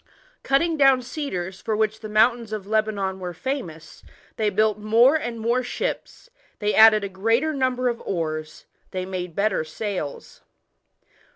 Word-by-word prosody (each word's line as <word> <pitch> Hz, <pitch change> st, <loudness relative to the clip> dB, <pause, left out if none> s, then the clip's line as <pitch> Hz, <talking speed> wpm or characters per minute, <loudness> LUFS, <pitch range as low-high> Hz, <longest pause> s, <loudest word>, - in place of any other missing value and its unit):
Cutting 320 Hz, +4 st, +1 dB
down 270 Hz, -3 st, +5 dB
cedars, 195 Hz, -, -5 dB
for 215 Hz, -1 st, -2 dB
which 220 Hz, 0 st, 0 dB
the 215 Hz, -, -8 dB
mountains 230 Hz, +1 st, +2 dB
of 215 Hz, -3 st, -4 dB
Lebanon 205 Hz, -3 st, -1 dB
were 180 Hz, -2 st, -6 dB
famous, 165 Hz, -, -6 dB, 0.3 s
they 215 Hz, -1 st, +1 dB
built 215 Hz, +1 st, +1 dB
more 225 Hz, +6 st, +4 dB
and 240 Hz, -7 st, -3 dB
more 235 Hz, +3 st, +1 dB
ships, 470 Hz, -, -5 dB, 0.3 s
they 210 Hz, 0 st, -1 dB
added 220 Hz, -1 st, +7 dB
a -, -, -1 dB
greater 225 Hz, +11 st, 0 dB
number 255 Hz, -2 st, 0 dB
of 235 Hz, -1 st, -2 dB
oars, 155 Hz, -3 st, -4 dB, 0.2 s
they 185 Hz, -1 st, -4 dB
made 180 Hz, -3 st, -5 dB
better 200 Hz, -4 st, +1 dB
sails. 160 Hz, -2 st, -6 dB
215 Hz, 150 wpm, -23 LUFS, 190-245 Hz, 0.3 s, added